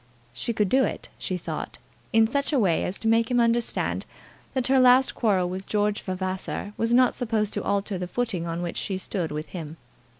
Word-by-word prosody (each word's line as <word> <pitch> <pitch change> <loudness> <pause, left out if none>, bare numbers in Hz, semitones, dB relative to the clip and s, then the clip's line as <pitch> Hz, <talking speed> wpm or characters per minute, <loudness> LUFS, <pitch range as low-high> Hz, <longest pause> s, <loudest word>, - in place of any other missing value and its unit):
She 130 - -2
could 210 -3 +1
do 265 +7 +4
it, - - -3
she 185 - -2
thought, 175 - -5 0.3
in 225 0 +5
such 280 +6 0
a 290 - +2
way 185 -9 +2
as 185 - -2
to 225 - -3
make 225 0 +3
him 245 -1 +2
understand 235 0 +1 0.5
that 260 -2 0
her 265 +1 +4
last 255 +1 +6
quarrel 195 -6 +1
with 185 +2 -5
George 210 0 0
Vavasor 185 +2 -4
was 230 +1 0
not 250 0 +5
supposed 220 -4 -1
to - - -2
alter 200 -1 -1
the 180 - -3
footing 195 -6 -2
on 170 +1 -3
which 170 - -4
she 190 - -2
stood 185 -3 -3
with 150 +1 -5
him. 160 -3 -7
210 Hz, 205 wpm, -25 LUFS, 185-235 Hz, 0.5 s, last